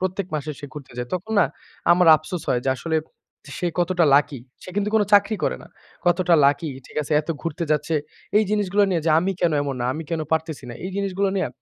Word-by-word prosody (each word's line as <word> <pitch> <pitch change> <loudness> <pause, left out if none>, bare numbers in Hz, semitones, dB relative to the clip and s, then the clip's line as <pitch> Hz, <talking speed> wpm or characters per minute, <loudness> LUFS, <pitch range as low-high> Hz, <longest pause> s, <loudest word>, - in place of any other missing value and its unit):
প্রত্যেক 185 +1 -2
মাসে 150 0 -3
সে 145 - -7
ঘুরতে 140 -4 -10
যায়। 125 0 -4
তখন 195 +5 -4
না 180 - +6 0.5
আমার 180 0 +4
আফসোস 155 +2 -6
হয় 125 - +2
যে - - +3
আসলে 160 +3 -1 0.6
সে 180 - -1
কতটা 175 0 +2
লাকি 140 -2 +2 0.2
সে 185 - -9
কিন্তু 205 0 +1
কোনো 215 - +4
চাকরি 205 +2 +5
করে 65 - 0
না। - - -14 0.4
কতটা 175 -1 +3
লাকি 150 +3 +1 0.2
ঠিক - - -16
আছে 150 - -5
এত 150 - -16
ঘুরতে 165 0 -3
যাচ্ছে। 150 +2 +1 0.4
এই 215 - +3
জিনিসগুলো 205 -1 +2
নিয়ে 175 -3 +1
যে - - +4
আমি 185 +4 0
কেনো 170 -3 +2
এমন 140 -2 -3
না, - - -1
আমি 160 - -4
কেনো 160 -2 -1
পারতেছি 160 -3 -1
না। - - -7
এই 185 - -4
জিনিসগুলো 200 0 0
নিয়ে 185 -4 +1
170 Hz, 220 wpm, -23 LUFS, 150-190 Hz, 0.6 s, না